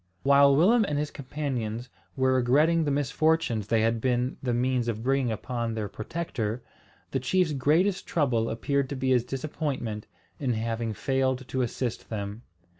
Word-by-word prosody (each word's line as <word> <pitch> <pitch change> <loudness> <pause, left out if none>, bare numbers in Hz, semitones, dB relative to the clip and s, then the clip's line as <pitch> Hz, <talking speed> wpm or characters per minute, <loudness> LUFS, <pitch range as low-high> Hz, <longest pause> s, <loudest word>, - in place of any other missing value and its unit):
While 140 0 +6
Willem 215 - +5
and 150 -6 -2
his 150 0 -2
companions 125 -5 -4 0.3
were 130 0 +3
regretting 150 +6 +3
the - - 0
misfortunes 145 -4 +1
they 115 0 +2
had 115 0 +1
been 125 0 0
the 125 - -1
means 125 0 +1
of 115 -1 -2
bringing 135 -2 +1
upon 115 +1 -3
their 110 -2 -2
protector, 115 -2 -4 0.5
the 135 - 0
chief's 160 +5 +1
greatest 160 +8 +2
trouble 125 -8 +1
appeared 140 +4 -1
to 140 - -3
be 130 0 -1
his 125 -2 +4
disappointment 130 -4 -4 0.3
in 130 -4 0
having 115 0 -2
failed 130 +2 0
to 130 0 -1
assist 120 0 -3
them. 105 0 -5
130 Hz, 160 wpm, -27 LUFS, 115-145 Hz, 0.5 s, While